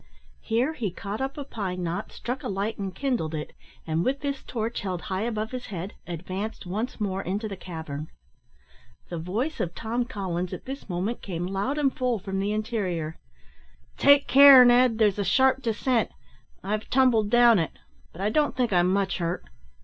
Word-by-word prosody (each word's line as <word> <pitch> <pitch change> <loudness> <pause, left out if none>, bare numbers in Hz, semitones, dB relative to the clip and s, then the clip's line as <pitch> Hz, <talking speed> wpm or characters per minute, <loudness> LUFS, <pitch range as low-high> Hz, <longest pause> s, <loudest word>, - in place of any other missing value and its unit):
Here 250 +7 0
he 230 -9 -2
caught 200 +5 -6
up 270 +2 -3
a 290 - -3
pine 190 -8 -4
knot, 175 +5 -3
struck 255 +4 -5
a 265 - -4
light 200 +2 -2
and 195 -2 -4
kindled 240 - -1
it, 150 - -5 0.3
and, 160 +1 0
with 275 +5 0
this 280 -2 -3
torch 230 -1 -3
held 185 -3 -3
high 190 0 -3
above 220 -1 -2
his 255 -1 -6
head, 190 0 -5
advanced 185 +6 -5
once 215 +9 -3
more 195 -2 -1
into 200 +4 -3
the 200 - -5
cavern. 160 -5 -6 1.0
The 170 - -4
voice 220 - -2
of 175 - -2
Tom 235 +2 -2
Collins 185 -6 -3
at - - -7
this 270 -3 -7
moment 190 +7 -2
came 175 -3 -4
loud 195 +10 -2
and 280 -3 +1
full 250 -2 0
from 195 -1 -4
the 200 +1 0
interior, 200 -8 -2 0.8
"Take 285 0 +5
care, 275 -2 +10
Ned, 245 -1 +5
there's 210 -3 +3
a - - +1
sharp 265 +7 +3
descent; 235 0 +1 0.5
I've 210 +2 -3
tumbled 245 -5 +3
down 240 -2 +6
it, 165 - -2 0.4
but 175 - -10
I 205 +2 +1
don't 295 +1 +1
think 245 -5 +1
I'm 175 0 +4
much 195 0 0
hurt." 170 - -2
210 Hz, 185 wpm, -26 LUFS, 185-250 Hz, 1.0 s, care